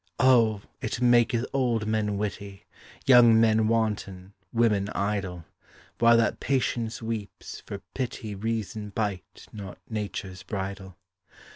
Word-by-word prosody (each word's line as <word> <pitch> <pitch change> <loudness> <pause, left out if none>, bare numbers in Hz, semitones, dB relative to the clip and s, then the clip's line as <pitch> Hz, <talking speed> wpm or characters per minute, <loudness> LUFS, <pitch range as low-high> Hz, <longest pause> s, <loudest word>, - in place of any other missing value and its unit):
Oh! 115 -5 +4 0.2
it 110 - -3
maketh 120 -1 +3
old 120 -5 +1
men 105 -2 0
witty, 100 -1 -5 0.4
Young 120 -3 +7
men 110 -1 +4
wanton, 105 -4 -1 0.2
women 105 -4 +2
idle, 95 -4 -2 0.5
While 115 0 +6
that 115 -2 +1
patience 120 -4 -1
weeps, 110 -3 -6
for 100 -2 -7
pity 120 -4 -4
Reason 110 0 -3
bite 100 -2 -4
not 100 -3 -8
nature's 100 -3 -5
bridle. 95 -1 -6
110 Hz, 115 wpm, -27 LUFS, 100-115 Hz, 0.5 s, Young